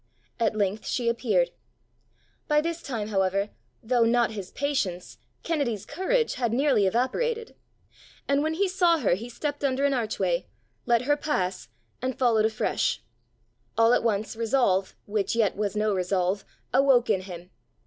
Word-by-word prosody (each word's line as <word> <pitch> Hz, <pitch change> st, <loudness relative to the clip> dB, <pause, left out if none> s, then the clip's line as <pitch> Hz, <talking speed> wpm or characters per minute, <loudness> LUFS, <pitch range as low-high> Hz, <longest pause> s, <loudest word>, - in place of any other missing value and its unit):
At 225 Hz, -2 st, +1 dB
length 205 Hz, 0 st, -1 dB
she 240 Hz, -2 st, -1 dB
appeared. 255 Hz, -, +1 dB, 1.0 s
By 300 Hz, -1 st, +4 dB
this 335 Hz, +2 st, -2 dB
time, 220 Hz, -6 st, -4 dB
however, 195 Hz, 0 st, 0 dB, 0.3 s
though 240 Hz, +1 st, +3 dB
not 235 Hz, 0 st, +3 dB
his 200 Hz, -4 st, -6 dB
patience, 210 Hz, -12 st, -2 dB, 0.2 s
Kennedy's 275 Hz, -, -1 dB
courage 450 Hz, +10 st, 0 dB
had 235 Hz, -2 st, +1 dB
nearly 260 Hz, -6 st, +3 dB
evaporated; 445 Hz, -, -1 dB, 0.7 s
and 280 Hz, 0 st, +2 dB
when 315 Hz, +1 st, 0 dB
he 400 Hz, +3 st, +2 dB
saw 360 Hz, -3 st, +3 dB
her 240 Hz, -, +2 dB
he 225 Hz, +7 st, -4 dB
stepped 290 Hz, +4 st, -4 dB
under 275 Hz, 0 st, +1 dB
an 280 Hz, -, +2 dB
archway, 200 Hz, -8 st, -1 dB, 0.4 s
let 235 Hz, 0 st, +3 dB
her 290 Hz, +3 st, +3 dB
pass, 190 Hz, -12 st, -2 dB, 0.3 s
and 255 Hz, 0 st, -2 dB
followed 230 Hz, -4 st, +3 dB
afresh. 220 Hz, 0 st, 0 dB, 0.7 s
All 230 Hz, +1 st, +5 dB
at -, -, +3 dB
once 220 Hz, 0 st, -1 dB
resolve, 225 Hz, -5 st, +1 dB
which 205 Hz, +1 st, -1 dB
yet 220 Hz, -4 st, +2 dB
was 210 Hz, 0 st, -2 dB
no 210 Hz, 0 st, +1 dB
resolve, 185 Hz, +1 st, 0 dB, 0.3 s
awoke 260 Hz, -2 st, +4 dB
in 190 Hz, -, +1 dB
him. 180 Hz, -1 st, -10 dB
235 Hz, 150 wpm, -26 LUFS, 200-280 Hz, 1.0 s, All